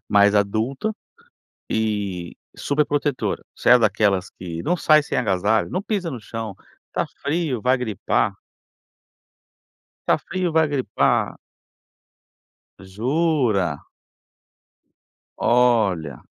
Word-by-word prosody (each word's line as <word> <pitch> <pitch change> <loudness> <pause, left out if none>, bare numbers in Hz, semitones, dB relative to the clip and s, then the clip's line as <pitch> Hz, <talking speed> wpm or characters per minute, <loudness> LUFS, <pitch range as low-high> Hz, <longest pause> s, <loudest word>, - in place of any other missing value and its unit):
mais 100 0 +5
adulta 110 - 0 0.8
e 100 -5 -2 0.2
superprotetora, 145 -1 -1
você - - +1
é 125 - +9
daquelas 105 -3 +1
que 85 -2 -7
não 175 +2 +1
sai 155 -2 +5
sem - - -2
agasalho, 105 -1 +1
não 185 +3 -2
pisa 195 -6 -2
no 125 -4 -6
chão, 110 -2 -6 0.3
está - - -2 0.2
frio 145 -5 -1
vai 130 +3 +3
gripar. 110 -6 -1 1.7
Está - - +3
frio, 185 -1 -2
vai 160 -1 +4
gripar. 140 -3 0 1.4
Jura? 110 - 0 1.5
Olha. 105 - +2
115 Hz, 95 wpm, -22 LUFS, 100-145 Hz, 1.7 s, é